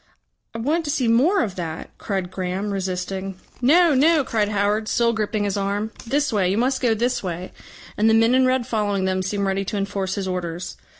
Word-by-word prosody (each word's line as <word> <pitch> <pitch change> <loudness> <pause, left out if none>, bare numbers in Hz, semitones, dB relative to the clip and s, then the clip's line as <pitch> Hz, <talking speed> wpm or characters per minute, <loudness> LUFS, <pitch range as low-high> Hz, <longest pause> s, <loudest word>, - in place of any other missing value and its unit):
"I - - -2
want 300 +9 0
to - - -3
see 265 -4 0
more 310 - +3
of 195 - -3
that," 165 -2 -6
cried 190 -3 -3
Graham, 185 +2 -3
resisting. 190 0 -3 0.3
"No, 325 +5 +5
no," 300 +3 +4
cried 220 -5 0
Howard, 210 +1 0
still 235 +1 +2
gripping 215 -1 -1
his 200 -1 -1
arm. 200 +2 -2 0.2
"This 285 +1 0
way. 190 -4 +2
You 195 - 0
must 260 +3 +1
go 235 -3 +2
this 245 +3 0
way." 180 -1 -5 0.5
And 220 +1 +4
the 220 - +5
men 225 +2 +4
in 260 0 +4
red 255 -1 +1
following 205 -4 -1
them 185 0 0
seemed 200 +2 -2
ready 195 0 0
to 205 - -3
enforce 195 -1 -2
his 195 -2 -3
orders. 180 -1 -4
210 Hz, 205 wpm, -22 LUFS, 190-245 Hz, 0.5 s, No